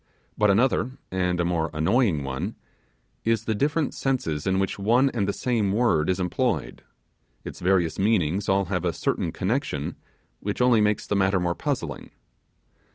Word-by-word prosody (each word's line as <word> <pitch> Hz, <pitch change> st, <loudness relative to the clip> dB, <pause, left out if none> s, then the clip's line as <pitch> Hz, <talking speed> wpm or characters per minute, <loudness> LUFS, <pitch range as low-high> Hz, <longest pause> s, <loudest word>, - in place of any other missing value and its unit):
But 105 Hz, -1 st, +3 dB
another, 125 Hz, +4 st, +2 dB
and 90 Hz, -1 st, 0 dB
a 85 Hz, -, +1 dB
more 85 Hz, -2 st, 0 dB
annoying 85 Hz, -, +2 dB
one, 65 Hz, -1 st, -4 dB, 0.7 s
is 115 Hz, -1 st, +1 dB
the 110 Hz, -, 0 dB
different 145 Hz, +6 st, 0 dB
senses 125 Hz, -, -2 dB
in 95 Hz, 0 st, +2 dB
which 95 Hz, 0 st, -1 dB
one 120 Hz, +7 st, +3 dB
and 105 Hz, -5 st, -1 dB
the -, -, +1 dB
same 110 Hz, -4 st, 0 dB
word 100 Hz, -8 st, +2 dB
is 95 Hz, 0 st, +1 dB
employed; 90 Hz, -2 st, -1 dB, 0.6 s
its -, -, -7 dB
various 90 Hz, -3 st, +1 dB
meanings 95 Hz, -2 st, +1 dB
all 95 Hz, 0 st, +3 dB
have 90 Hz, -1 st, -2 dB
a 85 Hz, -2 st, 0 dB
certain 80 Hz, -, -1 dB
connection, 95 Hz, -, -2 dB, 0.4 s
which 100 Hz, 0 st, -4 dB
only 125 Hz, -3 st, +4 dB
makes 105 Hz, 0 st, +1 dB
the 105 Hz, -, -1 dB
matter 95 Hz, -1 st, +2 dB
more 90 Hz, -1 st, 0 dB
puzzling. -, -, -4 dB
95 Hz, 160 wpm, -25 LUFS, 90-115 Hz, 0.7 s, only